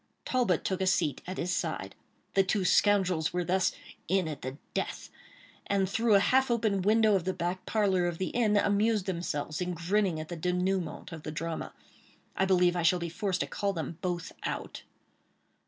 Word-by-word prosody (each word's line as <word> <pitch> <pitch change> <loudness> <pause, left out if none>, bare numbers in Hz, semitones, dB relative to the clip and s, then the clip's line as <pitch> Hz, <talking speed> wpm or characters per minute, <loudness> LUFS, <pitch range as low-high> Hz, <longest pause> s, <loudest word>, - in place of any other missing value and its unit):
Talbot 240 -10 +1
took 190 0 -1
a 190 - +1
seat 150 -7 +1
at 185 - -5
his 180 +1 -1
side. - - -3 0.4
The 195 - +5
two 190 0 0
scoundrels 185 -6 +3
were 180 0 0
thus 185 +2 +2 0.4
"in 185 -2 +2
at 150 -3 -6
the 130 +2 -5 0.2
death," - - -3 0.6
and 195 -1 +2
through 225 +2 +3
a - - +7
half 265 +6 +3
open 220 -5 +1
window 215 +2 +4
of 190 -3 +2
the 185 +1 -2
back 175 +2 -3
parlor 190 -5 +2
of 175 -1 -3
the 185 - -2
inn, 215 -4 +2
amused 205 0 +2
themselves 170 -4 -3
in 180 0 -2
grinning 180 0 0
at 155 - -6
the 175 - -4
dénouement 180 0 -1
of 165 -2 -7
the - - -6
drama. 165 +1 -4 0.6
I 190 - +2
believe 180 -2 +3
I 175 - 0
shall 170 +2 +4
be 170 -1 -4
forced 185 +2 -1
to - - +1
call 200 -1 -2
them 165 -1 -5
both 175 -2 -3
out. - - -4
185 Hz, 190 wpm, -30 LUFS, 170-200 Hz, 0.6 s, a